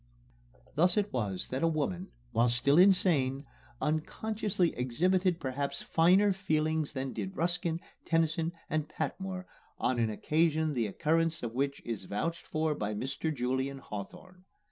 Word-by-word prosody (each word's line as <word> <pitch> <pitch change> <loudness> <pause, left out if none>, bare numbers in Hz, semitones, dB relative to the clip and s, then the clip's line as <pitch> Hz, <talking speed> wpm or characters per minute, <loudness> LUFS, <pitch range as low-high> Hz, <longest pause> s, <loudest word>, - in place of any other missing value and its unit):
Thus 175 +5 +4
it 205 0 0
was 100 -7 -2
that 130 +2 -2
a 165 - +4
woman, 140 - -1 0.2
while 120 +1 +3
still 140 +6 +4
insane, 160 -8 +4 0.3
unconsciously 185 +4 0
exhibited 175 +8 +1
perhaps 140 -1 -2
finer 185 +5 +4
feeling 155 -4 0
than 135 -2 -4
did 190 0 -5
Ruskin, 170 -1 0 0.3
Tennyson, 165 0 +1 0.2
and 155 -1 -1
Patmore 185 +3 -4 0.3
on 125 -1 0
an 115 -1 +2
occasion 155 +6 +1
the 120 -5 0
occurrence 165 +8 0
of 115 -1 -3
which 140 +2 -1
is 115 -5 -4
vouched 165 - -3
for 155 0 0
by 105 -6 -3
Mr. 135 +7 -2
Julian 130 0 -1
Hawthorne. 160 - -9
155 Hz, 140 wpm, -31 LUFS, 130-175 Hz, 0.3 s, Thus